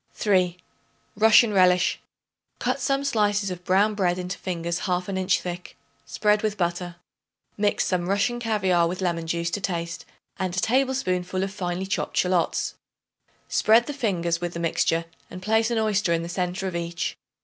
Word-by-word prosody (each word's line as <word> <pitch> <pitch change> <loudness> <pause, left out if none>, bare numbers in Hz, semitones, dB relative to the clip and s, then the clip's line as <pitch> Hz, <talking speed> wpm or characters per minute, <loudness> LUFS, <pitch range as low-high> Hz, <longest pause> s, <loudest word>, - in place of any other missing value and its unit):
3. 185 -4 +1 0.6
Russian 220 +1 +6
Relish. 180 -1 +4 0.6
Cut - - -1
some 275 0 0
slices 205 -6 +1
of 180 0 -7
brown 195 +4 +3
bread 185 -4 +1
into 180 +1 -5
fingers 170 -1 -3
half 180 0 0
an 195 - -3
inch 185 -1 +2
thick; 180 0 -7 0.3
spread 210 0 +2
with 215 -1 -1
butter. 175 0 -2 0.6
Mix 205 0 +1
some 180 -1 -1
Russian 205 +5 +1
caviare 190 -7 +2
with 180 +2 -4
lemon 170 -3 -1
juice 170 +1 -1
to 205 - -2
taste 170 -3 -3 0.3
and 185 -1 -2
a - - +4
tablespoonful 190 -7 0
of 195 0 -4
finely 180 -1 -3
chopped 195 - -3
shallots. 180 -2 +1 0.7
Spread 225 +2 +4
the 290 - -4
fingers 175 -10 -1
with 175 -1 -4
the - - -3
mixture 165 0 +1 0.2
and 180 - -8
place 220 +4 +1
an 235 - 0
oyster 210 -4 +1
in 165 0 0
the 170 - -6
centre 180 +2 -2
of 185 - -4
each. 170 0 -3
185 Hz, 170 wpm, -25 LUFS, 175-210 Hz, 0.7 s, Russian